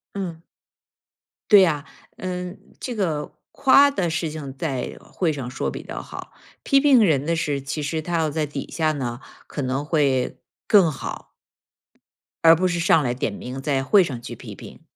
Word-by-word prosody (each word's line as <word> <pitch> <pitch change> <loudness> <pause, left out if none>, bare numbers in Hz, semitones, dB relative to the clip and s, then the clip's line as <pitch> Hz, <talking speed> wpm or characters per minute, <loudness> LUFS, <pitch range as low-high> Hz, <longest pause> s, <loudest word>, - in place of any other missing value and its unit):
嗯。 175 -5 -5 1.1
对 205 - +10
呀， 155 -5 +2 0.3
嗯， 180 0 -5 0.2
这 245 -2 -5
个 160 -8 -1 0.2
夸 280 +1 +5
的 180 -10 -1
事 165 0 -1
情 145 -3 -7
在 135 -5 -3
会 165 -4 -2
上 130 -4 -5
说 - - -2
比 - - -7
较 - - -6
好， - - -9 0.3
批 275 - +4
评 270 -5 +6
人 145 -6 +2
的 165 +1 +1
事 145 -3 -1
其 145 +2 -4
实 160 +2 -2
他 170 +2 -2
要 160 - +1
在 155 0 -1
底 140 -1 -6
下 155 -2 +1
呢， 120 -4 -4 0.3
可 145 - -5
能 130 +2 -1
会 140 -5 +1 0.3
更 195 -6 +5
好。 150 - -7 1.1
而 165 0 +9
不 185 +3 +1
是 175 -1 -1
上 165 -2 +4
来 120 -2 0
点 125 -3 -2
名 125 +6 -7
在 135 -2 0
会 195 +7 +5
上 130 -8 -4
去 - - -7
批 - - -10
评。 - - -12
155 Hz, 195 characters per minute, -23 LUFS, 140-180 Hz, 1.1 s, 对